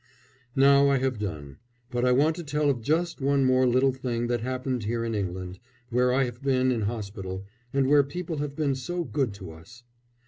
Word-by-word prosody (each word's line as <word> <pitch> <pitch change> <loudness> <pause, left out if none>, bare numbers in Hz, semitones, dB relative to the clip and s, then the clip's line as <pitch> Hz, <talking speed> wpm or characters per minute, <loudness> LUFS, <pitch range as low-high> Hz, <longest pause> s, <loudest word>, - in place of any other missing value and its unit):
Now 140 +1 +6
I 140 - +3
have 130 -3 -1
done; 75 -9 -5 0.3
but 120 0 -1
I 125 - +4
want 150 +5 +3
to 175 - -5
tell 150 -1 +1
of 125 -4 -4
just 165 +5 0
one 140 0 +2
more 130 0 +4
little 130 +2 +3
thing 120 -2 -2
that 120 -1 0
happened 130 -1 -3
here 115 +1 -1
in 115 - -2
England, 95 -2 -4 0.3
where 125 +1 +3
I 135 +2 +3
have 125 +1 -5
been 130 -2 +2
in 120 -3 -1
hospital, 100 -3 -4 0.3
and 135 -1 +2
where 145 +1 +6
people 160 +3 -5
have 145 -1 -4
been 145 -3 0
so 175 +7 -3
good 135 -7 -1
to 95 -4 -9
us. 85 +10 -15
130 Hz, 205 wpm, -27 LUFS, 115-140 Hz, 0.3 s, Now